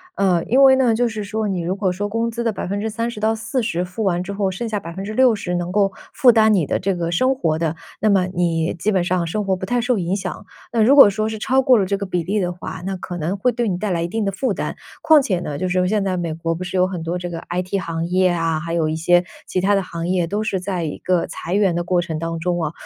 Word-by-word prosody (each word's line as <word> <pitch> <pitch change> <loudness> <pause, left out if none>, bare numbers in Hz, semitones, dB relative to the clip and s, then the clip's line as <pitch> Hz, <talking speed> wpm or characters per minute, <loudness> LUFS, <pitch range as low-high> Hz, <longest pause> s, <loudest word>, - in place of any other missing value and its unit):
呃， 180 -4 +2
因 260 +4 +3
为 265 -1 +8
呢 250 -4 +3
就 240 +2 +2
是 215 -2 -4
说 215 +1 -2
你 185 -3 -2
如 180 +3 -2
果 195 -2 0
说 205 +3 -3
工 230 +2 -1
资 235 +1 -4
的 230 - +1
30%-40% 220 0 -2
付 185 +5 -5
完 175 -2 +1
之 200 +2 -5
后， 195 -1 0
剩 230 +5 -4
下 210 -2 -1
60% 200 +2 0
能 175 0 -2
够 195 -1 +2 0.2
负 255 -4 +6
担 220 -1 +4
你 175 -7 +2
的 - - 0
这 195 +1 0
个 170 -1 -2
生 255 +9 +2
活 160 - 0
的， 165 -1 -1 0.3
那 215 - +3
么 190 -2 +3
你 170 -2 0
基 205 +6 -1
本 185 -3 +2
上 175 -1 0
生 210 +5 -2
活 190 -1 +1
不 185 - -5
太 245 +4 0
受 245 -1 +1
影 180 +1 -1
响。 190 -2 -5 0.3
那 225 -2 +3
如 270 +5 +5
果 275 -8 +9
说 215 +2 -1
是 220 -1 -5
超 265 +2 +2
过 255 -2 +5
了 195 - +1
这 200 +1 -1
个 200 - -4
比 180 -2 -2
例 205 +5 -1
的 180 -1 -1
话， 175 -1 -7
那 190 -1 -3
可 180 0 -6
能 175 +5 -2
会 250 +6 +2
对 240 -1 -1
你 175 - -1
带 210 +1 -2
来 170 -2 0
一 - - -1
定 220 +4 -2
的 195 - 0
负 210 +2 -1
担。 - - -4 0.3
况 315 -2 +6
且 185 -9 -1
呢 145 -5 -5
就 185 - -2
是 180 0 +1
现 210 0 +1
在 185 -2 -1
美 170 -2 -2
国， 165 +1 -2
不 175 +3 -5
是 185 - -6
有 180 - +4
很 185 -3 -4
多 170 +2 -2
这 175 0 -5
个 165 -1 -6
IT 180 +2 -2
行 165 0 -3
业 185 +1 +2
啊， 165 -2 0
还 165 +1 -5
有 160 -2 +1
一 155 - -1
些 175 +2 +3 0.2
其 185 - -1
他 200 +2 +3
的 195 - +2
行 170 -2 -5
业 180 -2 +1
都 210 +4 -2
是 195 -4 -1
在 180 -2 -3
一 150 - -4
个 180 -2 0
裁 170 - -6
员 195 -4 +3
的 175 0 -1
过 175 0 +1
程 160 -3 -4
当 165 0 -3
中 175 0 -1
啊。 155 - -1
185 Hz, 300 characters per minute, -20 LUFS, 175-215 Hz, 0.3 s, 果